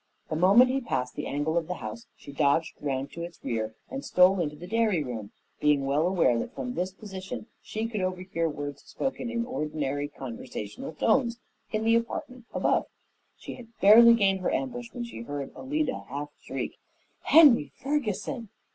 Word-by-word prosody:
The - - 0
moment 200 +10 +6
he 270 +1 0
passed 130 - -2
the - - -4
angle 155 +4 0
of 165 - -8
the 180 - -3
house 110 -4 -7
she 140 - -11
dodged 145 +3 +2
around 135 -1 -2
to 170 - -7
its 170 0 -7
rear 110 -1 -2
and 270 +1 -6
stole 185 +1 +5
into 150 -3 -1
the 165 +4 -9
dairy 215 -5 +1
room, 115 -6 -6 0.3
being 150 -2 +3
well 145 +5 +2
aware 170 -11 +3
that - - -5
from 125 -2 -4
this 180 +5 -2
position 195 +3 -7 0.2
she 220 +1 -4
could 215 -3 -3
overhear 185 -2 -1
words 145 -1 -5
spoken 265 -2 -3
in 235 0 -1
ordinary 150 - -2
conversational 120 -3 -7
tones 235 - +2 0.3
in 215 0 -1
the 225 +1 +4
apartment 235 +1 -2
above. - - +1 0.5
She - - -8
had 240 - -11
barely 230 +4 +9
gained 195 -3 +3
her 185 - 0
ambush 245 -3 -3
when 245 - -5
she 235 - -7
heard 140 +3 -5
Alida 285 -1 -2
half 145 +2 -5
shriek, - - -5 0.5
"Henry 275 - +7
Ferguson!" 250 -4 -2
180 Hz, 175 wpm, -28 LUFS, 145-235 Hz, 0.5 s, barely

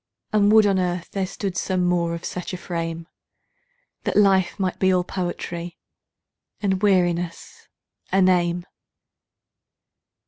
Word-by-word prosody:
and 205 -1 +4
would 220 -1 +7
on 195 -2 +2
earth 180 -1 -2
there 195 -2 -1
stood 195 -1 -4
some 180 0 0
more 170 -1 +1
of 170 - -8
such 180 +1 -5
a - - -3
frame, 165 -1 -4 0.9
That - - -2
life 195 -2 +3
might 185 -2 -1
be 190 0 +3
all 180 -1 +2
poetry, 175 -1 -5 0.8
and 190 -2 0
weariness 175 -4 0 0.4
a 190 - +3
name. 175 -2 +2
180 Hz, 130 wpm, -23 LUFS, 175-190 Hz, 0.9 s, would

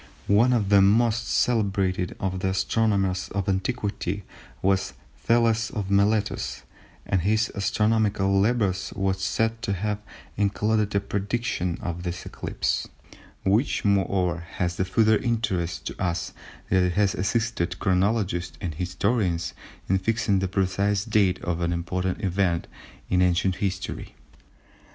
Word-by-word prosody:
One 110 +5 +4
of 110 -6 +1
the 100 -1 +6
most 115 +3 +3
celebrated 100 -6 +1
of 95 -1 -2
the 95 - 0
astronomers 95 -1 +1
of 100 -2 -1
antiquity 100 0 -2 0.4
was 95 0 +1 0.2
Thales 115 -1 +2
of 105 -6 -4
Miletus, 100 +1 +1 0.4
and 95 -3 +1
his 110 +4 +1
astronomical 100 -1 +1
labours 100 -4 +1
were 95 -1 +1
said 110 +4 -1
to 115 -5 -1
have 105 +2 -2 0.4
included 105 +1 +1
a - - +4
prediction 100 -3 -2
of 85 0 -3
this 90 0 -5
eclipse, - - -2 0.6
which 105 +7 +1
moreover 95 -3 +1 0.2
has 90 -1 0
the 95 - +1
further 110 +3 +3
interest 95 -9 -1
to - - -6
us 85 -2 -2 0.4
that 95 0 +4
it 90 -1 +1
has 100 0 +2
assisted 110 -2 -1
chronologists 95 -2 0
and 90 -5 -4
historians 90 +1 -1 0.3
in 95 +1 +2
fixing 105 0 +1
the 95 - 0
precise 100 +2 0
date 100 -5 +2
of 85 -1 -2
an 85 0 0
important 90 +3 -2
event 95 -3 0 0.5
in 90 0 +3
ancient 90 +1 +2
history. 95 -2 -4
100 Hz, 130 wpm, -25 LUFS, 90-105 Hz, 0.6 s, the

